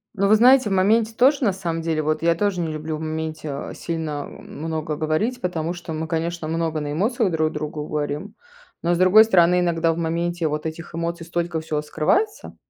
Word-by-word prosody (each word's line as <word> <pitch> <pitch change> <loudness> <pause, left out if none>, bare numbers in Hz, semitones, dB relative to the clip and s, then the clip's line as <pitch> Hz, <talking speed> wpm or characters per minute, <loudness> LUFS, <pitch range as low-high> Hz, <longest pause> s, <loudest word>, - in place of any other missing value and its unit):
Но 200 0 +2
вы 215 - +6
знаете, 250 +1 +6
в - - 0
моменте 215 +4 +3
тоже, 265 +5 +3
на 205 -5 +3
самом 170 -3 -3
деле. 160 -1 -1
Вот 155 +1 -1
я 165 0 +3
тоже 200 0 0
не 170 - -1
люблю 155 0 -4
в - - -9
моменте, 155 -1 -4
а, 140 0 -5
сильно 160 -3 -4
много 155 0 -5
говорить, 160 +12 -1
потому 170 -4 -2
что 175 -2 -7
мы, 160 +1 -3
конечно, 165 0 -2
много 160 -1 -1
на 145 0 -4
эмоциях 210 - +1
друг 155 -1 +1
другу 150 0 -4
говорим. 150 +5 -3 0.5
Но, 170 +1 +1
с - - +1
другой 185 +4 +7
стороны, 180 -4 +4
иногда 165 -1 +1
в - - -7
моменте 170 0 -1
вот 150 +1 -3
этих 160 +2 -6
эмоций 170 0 -3
столько 170 -1 -2
всего 155 -1 -2
скрывается 400 - -1
165 Hz, 205 wpm, -22 LUFS, 155-185 Hz, 0.5 s, другой